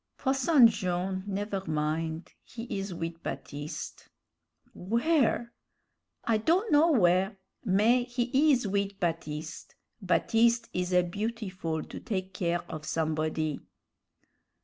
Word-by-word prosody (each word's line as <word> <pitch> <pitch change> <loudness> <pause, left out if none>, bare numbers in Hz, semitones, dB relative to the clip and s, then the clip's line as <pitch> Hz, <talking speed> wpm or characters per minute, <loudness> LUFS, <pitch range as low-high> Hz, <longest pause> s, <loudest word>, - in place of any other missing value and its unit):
"Posson 270 0 +4
Jone', 185 -3 0
never 200 0 -2
min'; 160 +2 -1 0.2
he 230 - -9
is 195 0 -3
wid 165 -1 -5
Baptiste." 145 +1 -6 0.6
"Where?" 235 - +1 0.7
"I 225 -2 +2
don' 350 - +1
know 310 +3 +5
w'ere 190 0 +3 0.3
mais 240 +4 +2
he 265 +5 +3
is 250 -6 +2
wid 200 0 -1
Baptiste. 165 -3 -4 0.3
Baptiste 225 +6 +2
is 180 0 -1
a 180 0 +4
beautiful 185 -4 -3
to - - -8
take 190 -3 -4
care 175 -1 -1
of 155 - -8
somebody." 155 -1 -1
195 Hz, 110 wpm, -29 LUFS, 165-235 Hz, 0.7 s, know